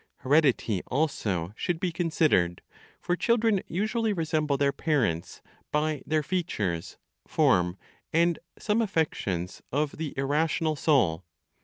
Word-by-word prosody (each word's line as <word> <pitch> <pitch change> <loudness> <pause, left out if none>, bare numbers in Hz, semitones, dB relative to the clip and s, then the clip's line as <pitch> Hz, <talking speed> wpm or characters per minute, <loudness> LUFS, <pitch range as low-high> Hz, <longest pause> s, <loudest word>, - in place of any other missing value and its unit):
Heredity 130 - +2
also 105 - -1
should 170 +6 -2
be 180 -1 -1
considered; 155 - +1 0.4
for 175 - 0
children 225 -1 +2
usually 215 +4 0
resemble 155 -4 0
their 140 0 +2
parents 130 - -1 0.3
by 150 -1 0
their 155 -1 +1
features, 110 - -2 0.3
form, 90 +1 +2 0.3
and 170 +1 +2 0.2
some 215 +2 +1
affections 125 - -1
of 145 +2 -1
the 155 -3 -4
irrational 155 +3 +1
soul. 115 - +2
150 Hz, 115 wpm, -27 LUFS, 115-170 Hz, 0.4 s, Heredity